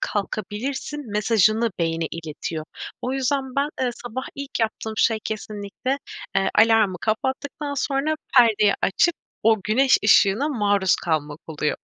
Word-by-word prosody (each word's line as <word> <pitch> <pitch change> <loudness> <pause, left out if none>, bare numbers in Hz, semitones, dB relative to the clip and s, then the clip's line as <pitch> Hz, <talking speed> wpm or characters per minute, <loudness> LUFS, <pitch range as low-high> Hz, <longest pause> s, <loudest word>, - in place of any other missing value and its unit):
kalkabilirsin 225 +7 -4
mesajını 215 +2 +2
beyine 165 -1 0
iletiyor. 160 -1 -5 0.4
O 255 - -2
yüzden 265 0 -1
ben, 280 +1 +2
eee, 255 -1 +1
sabah 245 +2 -6
ilk 280 -3 -5
yaptığım 220 0 -2
şey 225 0 +3
kesinlikle, 215 +4 -4 0.4
eee, 195 0 +2
alarmı 220 -4 +4
kapattıktan 275 +5 -2
sonra 280 +3 0 0.2
perdeyi 215 -4 +5
açıp 340 - +3 0.3
o 225 0 +5
güneş 255 +6 +4
ışığına 210 +6 +4
maruz 205 - +2
kalmak 155 -2 -2
oluyor. 150 -2 -2
220 Hz, 125 wpm, -23 LUFS, 200-265 Hz, 0.4 s, perdeyi